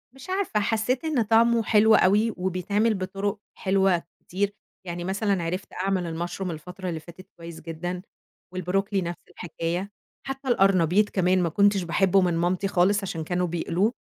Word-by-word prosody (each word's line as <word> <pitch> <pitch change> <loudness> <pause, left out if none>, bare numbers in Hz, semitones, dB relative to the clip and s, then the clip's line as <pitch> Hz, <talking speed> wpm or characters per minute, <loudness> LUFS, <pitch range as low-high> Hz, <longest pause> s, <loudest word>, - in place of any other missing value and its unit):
مش 270 +7 -12
عارفة، 375 - 0
حسيت 225 +6 0
إن 295 -7 +1
طعمه 230 +1 +4
حلو 220 0 +5
أوي، 210 +4 +3
وبيتعمل 190 +5 0
بطُرُق 195 +2 -3 0.2
حلوة 190 -2 +2 0.2
كتير، 200 +2 -2 0.3
يعني 175 0 -5
مثلًا 195 -1 0
عِرِفت 180 +3 -4
أعمل 180 -3 -2
الmushroom 190 0 -4
الفترة 180 +4 -7
اللي 165 -2 -3
فاتت 175 +4 -14
كويس 170 -1 -9
جدًا، 175 +2 -5 0.5
والبروكلي 195 +2 -1
نَفْس 170 0 -4
الحكاية، 175 +2 -4 0.4
حتى 270 0 -5
القرنبيط 195 -3 +3
كمان 185 -1 +2
ما 170 - +1
كُنتش 200 +2 +3
باحبه 190 +3 +3
من 180 -2 +1
مامتي 180 +3 0
خالص 195 +2 +2
عشان 165 -4 -4
كانوا 180 +2 -1
بيقلوه، 175 +6 0
190 Hz, 155 wpm, -25 LUFS, 175-205 Hz, 0.5 s, حلو